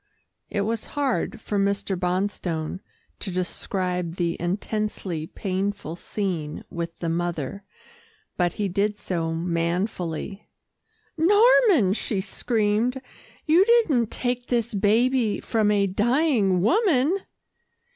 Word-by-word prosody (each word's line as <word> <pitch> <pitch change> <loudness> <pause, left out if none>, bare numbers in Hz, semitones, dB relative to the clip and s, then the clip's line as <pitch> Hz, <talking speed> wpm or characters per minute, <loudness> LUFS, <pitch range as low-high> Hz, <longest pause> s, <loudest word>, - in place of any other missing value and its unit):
It 205 - -1
was 220 +2 -2
hard 275 -5 0
for 205 -2 -2
Mr. 200 0 0
Bonstone 180 -2 -2 0.4
to - - -3
describe 180 -1 -2
the 170 -2 0
intensely 185 -2 -2
painful 190 -3 -3
scene 175 -6 -3
with 170 -1 -5
the 170 - -4
mother, 170 +2 -2 0.7
but 175 -1 +1
he 205 - -1
did 205 +3 0
so 165 -5 -2
manfully. 170 +2 -2 0.7
"Norman," 405 - +5
she 210 -1 -2
screamed, 225 +4 0 0.5
"you 335 +4 +6
didn't 375 - +3
take 245 0 -2
this 235 -2 0
baby 220 +3 +2
from 220 -3 +1
a 205 -1 +3
dying 210 - +2
woman!" 330 - +3
200 Hz, 105 wpm, -25 LUFS, 180-235 Hz, 0.7 s, you